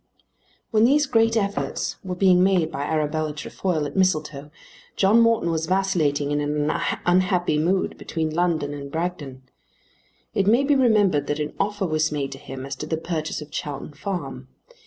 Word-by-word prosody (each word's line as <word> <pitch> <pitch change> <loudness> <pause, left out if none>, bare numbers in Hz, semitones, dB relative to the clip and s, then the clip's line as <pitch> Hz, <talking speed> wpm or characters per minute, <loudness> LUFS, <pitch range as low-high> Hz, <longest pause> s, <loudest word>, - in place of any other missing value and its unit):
While 220 -2 +4
these 290 +5 +4
great 225 -3 +2
efforts 200 -1 -2
were 185 -1 -4
being 180 -1 +4
made 180 -4 +2
by 140 -2 -3
Arabella 155 0 -1
Trefoil 155 0 -2
at 145 - -6
Mistletoe, 155 -6 0 0.5
John 205 +4 +4
Morton 230 -7 +3
was 160 -1 -1
vacillating 160 -7 +1
in 145 0 0
an 150 +1 0 0.3
unhappy 180 -3 +2
mood 185 +4 0
between 160 -1 -3
London 160 -4 0
and 140 -1 -7
Bragton. 160 -6 -4 0.9
It 195 - +1
may 235 +6 +4
be 290 +1 +3
remembered 205 - +3
that 145 +1 -1
an 150 0 -3
offer 205 -1 -1
was 155 -2 0
made 140 -2 -2
to 135 - -8
him 130 0 -8
as 135 0 -5
to 150 - -6
the 160 - -1
purchase 160 -1 -3
of 150 - -17
Chowton 145 -2 -5
Farm. 140 -6 -5
160 Hz, 170 wpm, -23 LUFS, 145-195 Hz, 0.9 s, While